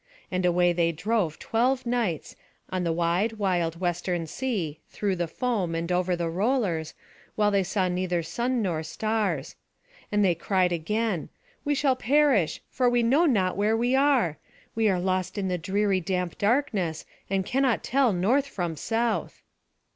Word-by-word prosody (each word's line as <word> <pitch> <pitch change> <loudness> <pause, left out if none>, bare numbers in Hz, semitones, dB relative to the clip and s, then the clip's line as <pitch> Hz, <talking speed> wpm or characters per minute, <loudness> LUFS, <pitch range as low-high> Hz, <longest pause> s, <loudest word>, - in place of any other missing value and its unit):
And 185 -1 +1
away 175 0 +3
they 170 -1 +2
drove 185 -1 -1
twelve 250 +3 0
nights, 235 -10 -1 0.4
on 185 -1 -1
the 170 - 0
wide 175 +6 +1
wild 175 -6 -1
western 175 -1 -1
sea, 175 - -3
through 200 -2 -1
the 175 -1 -2
foam, 190 -2 -1
and 165 +2 -2
over 180 0 +1
the 170 -1 -2
rollers, 185 - 0 0.4
while 210 -1 +2
they 200 -1 +3
saw 190 0 0
neither 180 -1 -1
sun 240 +7 -1
nor 170 -5 -1
stars. 195 -3 -2 0.6
And 205 -1 +3
they 180 - +4
cried 180 +2 +1
again: 195 +2 -1 0.3
"We 290 0 +1
shall 270 -2 +2
perish, 260 - +2
for 250 -1 +1
we 240 -1 +2
know 280 +9 +4
not 190 -9 +2
where 210 +3 +2
we 245 +3 +2
are. 265 - +2 0.3
We 220 -1 +2
are 185 -2 +1
lost 185 +2 -1
in 195 -2 -1
the 180 -1 -1
dreary 195 +3 +1
damp 180 0 -3
darkness, 200 - 0 0.2
and 190 -1 0
cannot 260 0 +1
tell 265 -2 +2
north 230 +10 +2
from 175 -10 -3
south." 225 +7 -2
190 Hz, 160 wpm, -26 LUFS, 175-230 Hz, 0.6 s, they